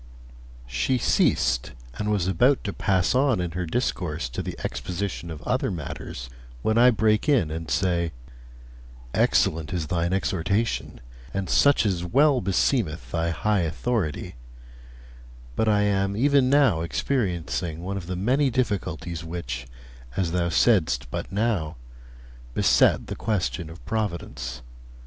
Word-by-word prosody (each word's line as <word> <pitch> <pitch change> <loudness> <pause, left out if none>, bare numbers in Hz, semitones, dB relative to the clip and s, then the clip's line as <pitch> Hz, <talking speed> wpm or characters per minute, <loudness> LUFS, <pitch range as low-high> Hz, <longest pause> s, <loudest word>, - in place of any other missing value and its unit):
I. - - -16
She 65 - +1
ceased, 65 - +2 0.3
and 105 - -1
was 100 -5 +1
about 120 +10 +3
to 100 - -3
pass 95 0 +1
on 130 -4 +3
in 90 -1 -2
her 90 +1 -3
discourse 80 - -2
to - - -4
the - - -5
exposition 90 -1 -4
of 75 -2 -8
other 125 -2 0
matters, 75 -7 -6 0.4
when 110 - +2
I 125 +1 +8
break 110 +3 +2
in 120 - +3
and 80 0 -5
say: 85 -4 +1 1.0
'Excellent 80 0 +2
is 85 -3 -2
thine 85 +2 -1
exhortation, 95 - -1 0.3
and 95 -1 -2
such 140 -5 +4
as 90 -4 0
well 135 - +3
beseemeth 95 - 0
thy 85 0 0
high 100 +6 +1
authority; 85 - -2 1.2
but 110 - +1
I 105 -1 +3
am 100 -1 +1
even 140 +1 +4
now 135 - +4
experiencing 85 - -2
one 95 +2 -3
of 95 -3 -5
the 90 - -3
many 130 +9 +2
difficulties 90 - -2
which, 65 -7 -5 0.5
as 85 -3 0
thou 85 0 0
saidst 80 - +2
but - - -4
now, 100 -7 0 0.8
beset - - +4
the - - -5
question 90 -6 -2
of 80 +2 -12
providence. 85 - -3
90 Hz, 140 wpm, -25 LUFS, 80-110 Hz, 1.2 s, I